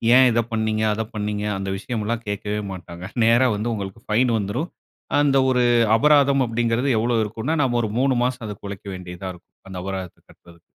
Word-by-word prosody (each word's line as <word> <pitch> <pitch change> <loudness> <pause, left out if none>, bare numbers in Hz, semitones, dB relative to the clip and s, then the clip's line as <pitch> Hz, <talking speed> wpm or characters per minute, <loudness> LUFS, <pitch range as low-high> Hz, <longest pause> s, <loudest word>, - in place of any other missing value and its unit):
"ஏன் 130 0 +7
இத 120 +1 +2
பண்ணீங்க? 110 -1 0
அத 110 +1 -2
பண்ணீங்க?" 105 0 -2
அந்த 95 0 -4
விஷயம்லாம் 115 +2 -3
கேட்கவே 105 +1 -2
மாட்டாங்க. 85 -1 -9 0.2
நேரா 120 +3 +5
வந்து 110 +3 -2
உங்களுக்கு 100 +1 -6
ஃபைன் 120 +3 +2
வந்துரும். 115 - -2 0.5
அந்த 140 -2 +3
ஒரு 125 -1 +2 0.3
அபராதம் 140 +1 +4
அப்படிங்கறது 115 +3 0
எவ்வளோ 120 +1 +1
இருக்குன்னா? 110 +9 -2
நம்ம 120 -2 +1
ஒரு 110 - -1
3 135 0 +3
மாசம் 125 -2 -2
அதுக்கு 105 -1 -7
உழைக்க 100 0 -8
வேண்டியதா 90 0 -7
இருக்கும். 90 - -20
அந்த 95 - -7
அபராதத்தை 95 -2 -5
கட்டுறதுக்கு. 85 -1 -19
110 Hz, 175 wpm, -22 LUFS, 100-125 Hz, 0.5 s, ஏன்